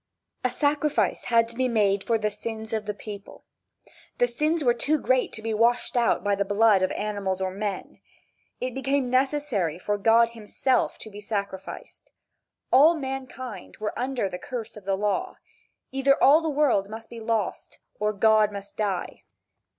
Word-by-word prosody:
A - - +2
sacrifice 295 0 0
had 230 -1 +3
to 235 - -9
be 255 +1 +1
made 205 -4 +2
for 230 -2 +1
the 210 -1 -1
sins 220 +1 -6
of 215 -1 -2
the 210 - -1
people. 205 -1 -10 0.7
The 245 - +4
sins 305 +6 0
were 240 -2 +4
too 295 +6 +1
great 260 -3 +1
to 220 - -6
be 225 0 -1
washed 235 +4 +2
out 240 -1 +2
by 205 0 +1
the 200 0 +1
blood 205 0 +4
of 185 - +1
animals 200 -3 -2
or 190 0 -1
men. 200 0 -5 0.6
It 255 0 -3
became 270 0 0
necessary 255 - 0
for. 205 +3 -2
God 230 +2 +5
himself 230 +3 -1
to 220 - -9
be 205 +1 -9
sacrificed. 200 -2 -6 0.6
All 305 +6 +7
mankind 260 - -6
were 215 -1 -3
under 250 -4 -1
the 180 -1 -6
curse 240 -2 -6
of 210 -3 -12
the 195 0 +1
law. 205 -1 -1 0.5
Either 270 +1 +3
all 295 +4 +6
the 325 - -1
world 275 -10 +2
must 220 +1 -9
be 235 - -8
lost 220 -3 -2 0.2
or 210 0 +1
God 215 0 +4
must 200 0 -9
die. 200 -4 -2
225 Hz, 175 wpm, -26 LUFS, 205-255 Hz, 0.7 s, All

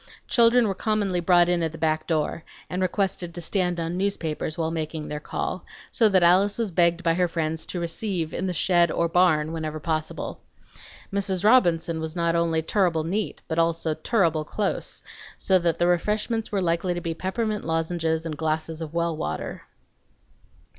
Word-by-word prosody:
Children 235 0 +4
were 195 - 0
commonly 200 -3 0
brought 175 0 +4
in 175 -1 +1
at 165 -1 -1
the - - -7
back 155 0 0
door, 160 0 -1 0.3
and 180 - -2
requested 185 -2 -1
to - - -3
stand 180 0 0
on 165 +1 -2
newspapers 165 -5 -2
while 160 -1 -1
making 155 -1 -4
their 150 - -4
call, - - -4 0.3
so 225 -4 +4
that 190 -3 +4
Alice 190 +4 +4
was 225 -4 -1
begged 170 0 +2
by 165 -1 +3
her 180 +1 +2
friends 160 -1 -2
to 180 - -3
"receive" 170 -1 -3
in 190 - -2
the - - -1
shed 175 0 +3
or 170 - +1
barn 160 -3 +3
whenever 155 -1 -4
possible. 155 -1 -3 0.7
Mrs. 195 -2 0
Robinson 170 -8 +3
was 160 +1 -5
not 170 -1 +1
only 165 -1 +1
"turrible 170 -3 +1
neat," 195 +6 -3
but 160 0 -1 0.4
"turrible 170 -9 +2
close," 200 +6 -3 0.3
so 190 -1 +3
that 170 -1 0
the 175 - +2
refreshments 210 +6 0
were 200 -2 0
likely 170 +1 0
to - - -2
be 165 -1 -2
peppermint 210 +5 -2
lozenges 165 0 -1
and 160 -2 -3
glasses 160 +1 -2
of 160 0 -6
well 170 -1 0
water. 80 - -4
170 Hz, 175 wpm, -25 LUFS, 160-190 Hz, 0.7 s, Children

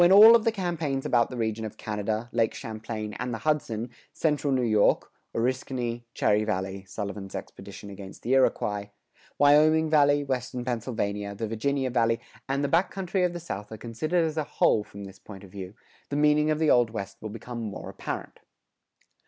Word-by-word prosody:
When 175 +1 +7
all 215 +4 +10
of 230 -1 +2
the 230 - +4
campaigns 165 -9 -2
about 120 -1 +3
the 125 - -6
region 110 -1 -1
of 110 - -6
Canada, 105 +2 -2
Lake 115 -1 +1
Champlain, 110 -1 -5
and 125 0 -2
the 115 - -2
Hudson, 120 -4 -1 0.2
central 150 -3 0
New 130 -2 +2
York 110 -3 +3 0.2
(Oriskany, 120 0 -2
Cherry 105 +1 +3
Valley, 95 -2 -3
Sullivan's 100 -1 -6
expedition 100 - -8
against 95 -1 -10
the 125 - +1
Iroquois), 105 -6 +2 0.5
Wyoming 155 +2 +5
Valley, 145 -1 +4
western 125 -2 -3
Pennsylvania, 105 -4 -2
the 110 +2 -3
Virginia 130 +4 -1
Valley, 115 -1 +2 0.3
and 140 +1 0
the - - +2
back 170 +6 +3
country 190 -1 -1
of 180 -1 +1
the 175 - -5
South 105 - -6
are 110 - -6
considered 155 +10 0
as 160 0 -3
a 155 - +1
whole 110 -6 +2
from 100 -1 -10
this 95 -1 -11
point 100 -2 -11
of 95 - -13
view, 95 0 -8 0.3
the 145 - -3
meaning 150 +1 +4
of 155 - +2
the 155 -1 +3
Old 120 -2 +5
West 100 -3 -6
will 110 - -5
become 115 +2 -7
more 105 -3 -6
apparent. - - -6
120 Hz, 185 wpm, -27 LUFS, 105-150 Hz, 0.5 s, all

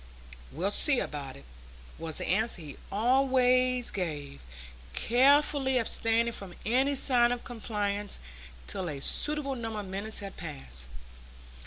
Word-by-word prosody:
"We'll 180 +8 -2
see 275 +3 +3
about 140 -3 -5
it," 70 - -15 0.5
was 160 -2 -3
the - - -2
answer 215 +3 +1
he 150 -4 -10
always 255 +2 +2
gave, 150 -7 -5 0.5
carefully 270 - +3
abstaining 230 0 +1
from 195 -5 -6
any 265 +6 +2
sign 245 -3 +6
of 245 -1 -3
compliance 210 -4 -2 0.5
till 180 - -3
a 145 -2 -5
suitable 295 - 0
number 225 -4 -5
of - - -9
minutes 200 +3 -3
had 195 -1 -7
passed. 135 - -5
225 Hz, 130 wpm, -29 LUFS, 180-255 Hz, 0.5 s, sign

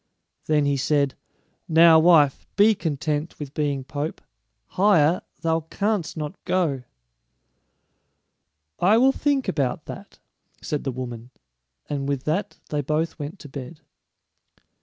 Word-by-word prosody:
Then 150 -2 +2
he 140 -1 +1
said, 140 0 +1 0.6
"Now, 165 0 +7
wife, 160 -5 +4
be 210 +2 +6
content 155 -3 -3
with 145 -2 -7
being 145 -3 -1
pope; 145 +3 -4 0.5
higher 180 -4 +3 0.2
thou 165 -1 +1
canst 205 -7 -1
not 155 +4 -6
go." 160 -8 0 2.0
"I 205 +5 +4
will 260 +3 +5
think 280 -1 0
about 140 -4 -1
that," - - -10 0.4
said 150 -2 -4
the 135 - -1
woman, 120 -2 -7 0.6
and 140 -1 -3
with 140 -2 -2
that 185 +7 -2
they 150 -1 0
both 155 +4 -2
went 150 +6 -6
to 145 - -10
bed. 140 +4 -8
150 Hz, 125 wpm, -24 LUFS, 140-175 Hz, 2.0 s, Now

